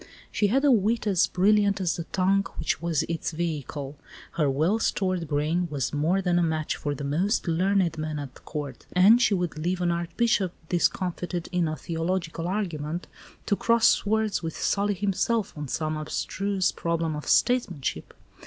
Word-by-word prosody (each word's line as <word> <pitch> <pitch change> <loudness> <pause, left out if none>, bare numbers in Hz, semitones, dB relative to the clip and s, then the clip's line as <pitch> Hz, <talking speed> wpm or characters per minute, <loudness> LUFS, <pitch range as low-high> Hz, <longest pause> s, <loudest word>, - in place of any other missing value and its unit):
She 210 - +2
had 270 +7 +2
a 285 - +6
wit 225 0 +2
as 195 -5 +3
brilliant 200 +1 +3
as 180 -3 0
the 170 - -5
tongue 195 +2 +1
which - - -1
was 165 -2 0
its 165 0 -3
vehicle; 150 -3 -4 0.3
her 150 -4 +1
well 160 +11 +1
stored 185 -6 0
brain 155 +4 0
was 135 -4 -2
more 165 +7 +1
than 175 -1 +2
a - - +2
match 160 -2 0
for 145 -1 -3
the 145 - -6
most 180 - 0
learned 175 -1 +1
men 155 -1 -3
at 140 -3 -8
Court, 145 -4 -6
and 205 +7 +6
she 215 -4 +4
would 175 -4 -2
leave 175 +3 -1
an 175 -1 +1
archbishop 175 +3 0 0.2
discomfited 180 0 -1
in 180 -2 +1
a 155 - -2
theological 165 +1 -3
argument, 175 -4 -3 0.4
to 200 - +2
cross 230 +2 +2
swords 220 0 +2
with 165 -2 -5
Sully 205 0 +1
himself 205 +2 0
on 150 -1 -5
some 155 +3 -2
abstruse 185 +5 -1
problem 165 -2 -1
of 150 - -7
statesmanship. 170 - +1
175 Hz, 170 wpm, -26 LUFS, 155-195 Hz, 0.4 s, a